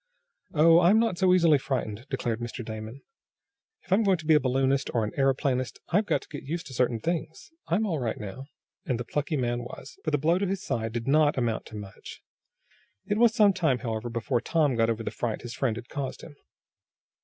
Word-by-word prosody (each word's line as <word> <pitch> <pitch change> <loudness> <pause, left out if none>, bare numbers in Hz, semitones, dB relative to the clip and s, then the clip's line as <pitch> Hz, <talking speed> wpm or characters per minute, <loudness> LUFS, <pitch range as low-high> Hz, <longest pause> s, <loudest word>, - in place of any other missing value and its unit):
"Oh, 165 +2 +7
I'm 180 +5 +5
not 225 -6 +1
so 185 -2 +4
easily 170 -5 +5
frightened," 125 -3 -3
declared 120 -4 -2
Mr. 120 0 -6
Damon. 110 +4 -7 0.8
"If 185 - -1
I'm 200 - +4
going 195 -4 +3
to 160 - -11
be 160 - +5
a 150 - +6
balloonist, 135 +1 +1
or 115 - +2
an 105 - -2
aeroplanist 130 -3 0
I've 205 +4 +2
got - - +1
to - - -18
get 145 - -7
used 165 +4 -4
to 140 - -10
certain 120 -2 +1
things. 160 - -4 0.2
I'm 195 +7 +1
all 165 -7 -1
right 115 -4 -2
now," 110 +7 -7 0.4
and 125 -3 -2
the 120 - -4
plucky 150 +4 -2
man 120 -2 -1
was, 125 +3 -10
for - - -1
the 150 - +2
blow 165 +5 +2
to 200 - 0
his 195 +1 -3
side 115 - -2
did 115 +1 -4
not 150 +1 +4
amount 115 -3 -1
to 110 - -11
much. 100 -2 -10 0.8
It 205 +1 -1
was 230 -2 +5
some 205 -2 +5
time, 160 -9 +1
however, 115 +1 -3
before 115 +1 -1
Tom 150 -3 +1
got 115 0 +2
over 115 0 -1
the - - -3
fright 115 -3 -3
his 120 -1 -6
friend 125 -5 0
had 120 +1 -8
caused 140 -4 -5
him. 150 - -11
135 Hz, 220 wpm, -27 LUFS, 120-165 Hz, 0.8 s, Oh